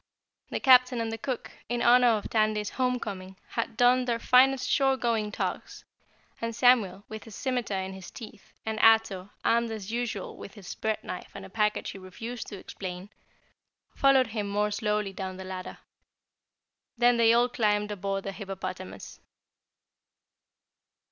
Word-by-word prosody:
The -, -, -2 dB
Captain 250 Hz, -1 st, +6 dB
and 225 Hz, -1 st, -2 dB
the 225 Hz, -, -4 dB
cook, 255 Hz, +1 st, -4 dB, 0.2 s
in 240 Hz, 0 st, -1 dB
honor 245 Hz, +1 st, +6 dB
of 205 Hz, -, -6 dB
Tandy's 215 Hz, -1 st, +1 dB
homecoming, 205 Hz, -7 st, -3 dB
had 230 Hz, -1 st, -3 dB
donned 250 Hz, +1 st, +4 dB
their 235 Hz, -1 st, +1 dB
finest 255 Hz, +2 st, +4 dB
shore 270 Hz, 0 st, +3 dB
going 225 Hz, -4 st, 0 dB
togs, -, -, -4 dB, 0.6 s
and 230 Hz, 0 st, -3 dB
Samuel, 225 Hz, -6 st, +3 dB
with 220 Hz, +1 st, -9 dB
a -, -, -9 dB
scimiter 245 Hz, -1 st, -2 dB
in 190 Hz, 0 st, -4 dB
his 190 Hz, -2 st, -9 dB
teeth, 220 Hz, -4 st, -12 dB
and 220 Hz, 0 st, -2 dB
Ato, 220 Hz, -4 st, +4 dB, 0.2 s
armed 235 Hz, 0 st, +3 dB
as 220 Hz, -2 st, -6 dB
usual 235 Hz, -4 st, -3 dB
with 200 Hz, -, -10 dB
his 195 Hz, -4 st, -8 dB
bread 220 Hz, -1 st, -2 dB
knife 180 Hz, -, -7 dB
and 195 Hz, -1 st, -7 dB
a 190 Hz, -, -13 dB
package 210 Hz, 0 st, 0 dB
he 195 Hz, -, -10 dB
refused 225 Hz, +6 st, -7 dB
to 205 Hz, -, -7 dB
explain, 185 Hz, +1 st, -7 dB, 0.8 s
followed 275 Hz, -2 st, +4 dB
him 210 Hz, -3 st, -2 dB
more 210 Hz, +1 st, 0 dB
slowly 210 Hz, -1 st, -1 dB
down 190 Hz, -1 st, -5 dB
the 190 Hz, -, -7 dB
ladder. 185 Hz, -1 st, -7 dB, 1.2 s
Then 240 Hz, 0 st, +4 dB
they 230 Hz, -1 st, +5 dB
all 240 Hz, +1 st, +4 dB
climbed 210 Hz, -3 st, 0 dB
aboard 195 Hz, -1 st, -3 dB
the 195 Hz, -, -4 dB
hippopotamus. 185 Hz, -, -7 dB
220 Hz, 155 wpm, -28 LUFS, 195-240 Hz, 1.2 s, Captain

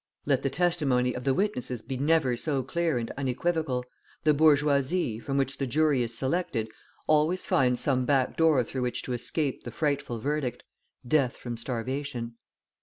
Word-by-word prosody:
Let 135 Hz, -2 st, +2 dB
the 135 Hz, -, 0 dB
testimony 135 Hz, -6 st, +1 dB
of 125 Hz, -, -6 dB
the 135 Hz, -, +3 dB
witnesses 130 Hz, -, -2 dB
be 135 Hz, -, -4 dB
never 140 Hz, -2 st, +2 dB
so 135 Hz, +1 st, -1 dB
clear 165 Hz, +1 st, 0 dB
and 115 Hz, -1 st, -3 dB
unequivocal, 135 Hz, -1 st, -1 dB, 0.4 s
the 155 Hz, -1 st, +5 dB
bourgeoisie, 145 Hz, -3 st, +3 dB
from 135 Hz, +3 st, -3 dB
which 135 Hz, 0 st, 0 dB
the 135 Hz, -, -1 dB
jury 150 Hz, 0 st, +2 dB
is 115 Hz, -1 st, 0 dB
selected, 130 Hz, -6 st, -1 dB, 0.3 s
always 155 Hz, +4 st, +2 dB
finds 125 Hz, -2 st, +2 dB
some 130 Hz, -2 st, +1 dB
backdoor 140 Hz, +2 st, +3 dB
through 130 Hz, +3 st, -5 dB
which 125 Hz, -1 st, -2 dB
to 125 Hz, -, -3 dB
escape 130 Hz, +4 st, -2 dB
the -, -, -6 dB
frightful 140 Hz, -2 st, -1 dB
verdict, 135 Hz, 0 st, -2 dB, 0.4 s
death 135 Hz, -2 st, +2 dB
from 120 Hz, -1 st, -5 dB
starvation. 125 Hz, +1 st, -4 dB
135 Hz, 160 wpm, -28 LUFS, 125-150 Hz, 0.4 s, the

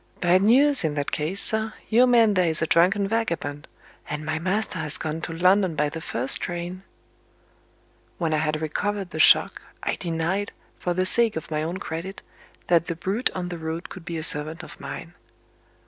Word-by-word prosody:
"Bad 180 Hz, +1 st, +3 dB
news, 270 Hz, +6 st, +5 dB
in 155 Hz, -2 st, -1 dB
that 145 Hz, -1 st, -2 dB
case, 160 Hz, +6 st, -2 dB
sir. 220 Hz, 0 st, +1 dB
Your 245 Hz, +3 st, +4 dB
man 230 Hz, -4 st, +4 dB
there 180 Hz, -2 st, +2 dB
is 160 Hz, -, 0 dB
a 160 Hz, -, +1 dB
drunken 185 Hz, +5 st, +3 dB
vagabond; 170 Hz, -10 st, -3 dB, 0.4 s
and 150 Hz, +1 st, -4 dB
my 160 Hz, +1 st, -2 dB
master 185 Hz, +1 st, -1 dB
has 150 Hz, -2 st, 0 dB
gone 160 Hz, +1 st, -4 dB
to 165 Hz, -, -5 dB
London 185 Hz, +1 st, +2 dB
by 150 Hz, 0 st, 0 dB
the 165 Hz, +2 st, -7 dB
first 130 Hz, -4 st, -2 dB
train." 175 Hz, +1 st, -5 dB, 1.4 s
When 165 Hz, -3 st, -1 dB
I -, -, +2 dB
had 155 Hz, 0 st, -1 dB
recovered 200 Hz, +4 st, -3 dB
the 160 Hz, -, -6 dB
shock, -, -, +5 dB, 0.2 s
I -, -, -1 dB
denied, 170 Hz, +4 st, -2 dB, 0.3 s
for 175 Hz, -1 st, -2 dB
the 185 Hz, +1 st, +1 dB
sake 230 Hz, +3 st, +5 dB
of 160 Hz, -, -6 dB
my 155 Hz, 0 st, -1 dB
own 165 Hz, +4 st, -3 dB
credit, 185 Hz, +2 st, -6 dB, 0.4 s
that 170 Hz, -1 st, +2 dB
the 170 Hz, -, -3 dB
brute 195 Hz, +8 st, -1 dB
on 180 Hz, -1 st, -4 dB
the 175 Hz, -2 st, -6 dB
road 160 Hz, +2 st, -5 dB
could 185 Hz, -, -10 dB
be 170 Hz, 0 st, -5 dB
a 160 Hz, -, -4 dB
servant 155 Hz, +1 st, +2 dB
of -, -, -12 dB
mine. -, -, -8 dB
175 Hz, 195 wpm, -24 LUFS, 160-195 Hz, 1.4 s, news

